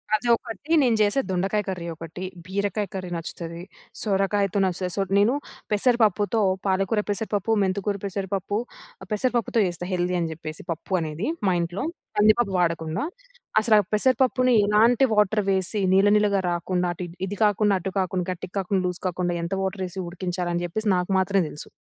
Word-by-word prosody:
అది 215 Hz, +3 st, -3 dB
ఒకటి. 230 Hz, +6 st, -8 dB
నేను 235 Hz, -3 st, +3 dB
చేసే 210 Hz, +6 st, +3 dB
దొండకాయ 190 Hz, +3 st, 0 dB
కర్రీ 180 Hz, -3 st, -4 dB
ఒకటి, 165 Hz, +3 st, -8 dB, 0.2 s
బీరకాయ 200 Hz, +2 st, -1 dB
కర్రీ 185 Hz, -2 st, -5 dB
నచ్చుతది, 170 Hz, 0 st, -6 dB, 0.4 s
సొరకాయతో 200 Hz, -1 st, +1 dB
నచ్చుతది. 185 Hz, 0 st, -2 dB
సో, -, -, +2 dB, 0.2 s
నేను 205 Hz, +5 st, +4 dB, 0.4 s
పెసరపప్పుతో 215 Hz, -1 st, +2 dB, 0.3 s
పాలకూర, 195 Hz, +3 st, +1 dB
పెసరపప్పు, 205 Hz, 0 st, -1 dB
మెంతికూర 200 Hz, +2 st, -1 dB
పెసరపప్పు, 195 Hz, +1 st, -2 dB, 0.5 s
పెసరపప్పుతో 235 Hz, +1 st, 0 dB
చేస్తా. 175 Hz, 0 st, -5 dB
హెల్దీ 180 Hz, 0 st, 0 dB
అని 165 Hz, -1 st, -1 dB
చెప్పేసి 155 Hz, 0 st, -8 dB
పప్పు 165 Hz, +4 st, -7 dB
అనేది 160 Hz, +5 st, -3 dB, 0.2 s
మా 185 Hz, -, +3 dB
ఇంట్లో 175 Hz, +3 st, -3 dB, 0.3 s
కందిపప్పు 215 Hz, 0 st, +4 dB
వాడకుండా. 165 Hz, -, 0 dB, 0.6 s
అసలు 220 Hz, 0 st, +4 dB
ఆ -, -, +7 dB
పెసరపప్పుని 255 Hz, +2 st, +3 dB
ఎలాంటి 225 Hz, +5 st, +4 dB
వాటర్ 210 Hz, 0 st, +3 dB
వేసి, 190 Hz, +2 st, 0 dB
నీళ్ల 195 Hz, +2 st, +5 dB
నీళ్లగా 205 Hz, -1 st, +3 dB
రాకుండా, 180 Hz, +1 st, -1 dB
అటు 180 Hz, -, -5 dB, 0.2 s
ఇది 205 Hz, -, -4 dB
కాకుండా, 210 Hz, 0 st, +3 dB
అటు 190 Hz, +2 st, -4 dB
కాకుండా, 185 Hz, -1 st, -1 dB
గట్టికి 180 Hz, 0 st, -7 dB
కాకుండా, 190 Hz, 0 st, 0 dB
లూజ్ 180 Hz, 0 st, -4 dB
కాకుండా 180 Hz, 0 st, -1 dB
ఎంత 170 Hz, +3 st, -3 dB
వాటర్ 190 Hz, 0 st, -2 dB
వేసి 185 Hz, +1 st, -7 dB
ఉడికించాలని 175 Hz, -1 st, -3 dB
చెప్పేసి 215 Hz, +5 st, -2 dB
నాకు 180 Hz, +1 st, -2 dB
మాత్రమే 195 Hz, 0 st, +2 dB
తెలుసు. 150 Hz, -, -9 dB
195 Hz, 155 wpm, -24 LUFS, 180-210 Hz, 0.6 s, ఆ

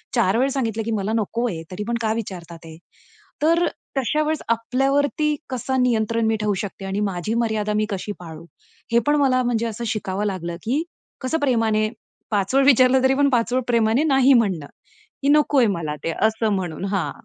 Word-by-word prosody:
4 225 Hz, -2 st, +2 dB
वेळा 265 Hz, +2 st, +2 dB
सांगितलं, 225 Hz, -5 st, -1 dB
की 230 Hz, -, -2 dB
मला 205 Hz, +2 st, -2 dB
नको 230 Hz, +3 st, -1 dB
आहे, 165 Hz, -3 st, -5 dB
तरी 200 Hz, +3 st, -4 dB
पण 235 Hz, 0 st, 0 dB
का 220 Hz, -1 st, +1 dB
विचारतात 175 Hz, -7 st, -7 dB
हे? 160 Hz, 0 st, -11 dB, 0.7 s
तर 335 Hz, +2 st, +3 dB, 0.3 s
तशा 300 Hz, +4 st, +1 dB
वेळेस 310 Hz, 0 st, -1 dB
आपल्यावरती 275 Hz, +6 st, +1 dB
कसं 260 Hz, +1 st, -1 dB
नियंत्रण 230 Hz, -1 st, +1 dB
मी 220 Hz, -, +2 dB
ठेवू 210 Hz, -1 st, +1 dB
शकते 195 Hz, -1 st, -7 dB
आणि 195 Hz, +1 st, -2 dB
माझी 180 Hz, +5 st, -3 dB
मर्यादा 215 Hz, -2 st, -1 dB
मी -, -, +1 dB
कशी 200 Hz, +1 st, -4 dB
पाळू? 165 Hz, -1 st, -10 dB, 0.5 s
हे 235 Hz, -, +6 dB
पण 295 Hz, -, +4 dB
मला 255 Hz, -2 st, +3 dB
म्हणजे 235 Hz, -1 st, 0 dB
असं 225 Hz, +2 st, -5 dB
शिकावं 205 Hz, -2 st, -2 dB
लागलं, 175 Hz, -4 st, -3 dB
की 270 Hz, +9 st, 0 dB, 0.4 s
कसं 315 Hz, +5 st, -1 dB
प्रेमाने 225 Hz, -5 st, +1 dB, 0.4 s
पाचवळ 210 Hz, +7 st, +2 dB
विचारलं 260 Hz, -1 st, +5 dB
तरी 265 Hz, 0 st, +4 dB
पण 280 Hz, 0 st, +3 dB
पाचवळ 245 Hz, 0 st, +1 dB
प्रेमाने 230 Hz, +3 st, +2 dB
नाही 270 Hz, -3 st, +4 dB
म्हणणं 190 Hz, -, +1 dB, 0.5 s
की 275 Hz, -, -1 dB
नकोय 290 Hz, -4 st, +4 dB
मला 165 Hz, -6 st, -3 dB
ते 165 Hz, -, -1 dB
असं 220 Hz, 0 st, +1 dB
म्हणून 180 Hz, -1 st, -4 dB
हां. 190 Hz, -, -1 dB
225 Hz, 180 wpm, -22 LUFS, 200-260 Hz, 0.7 s, हे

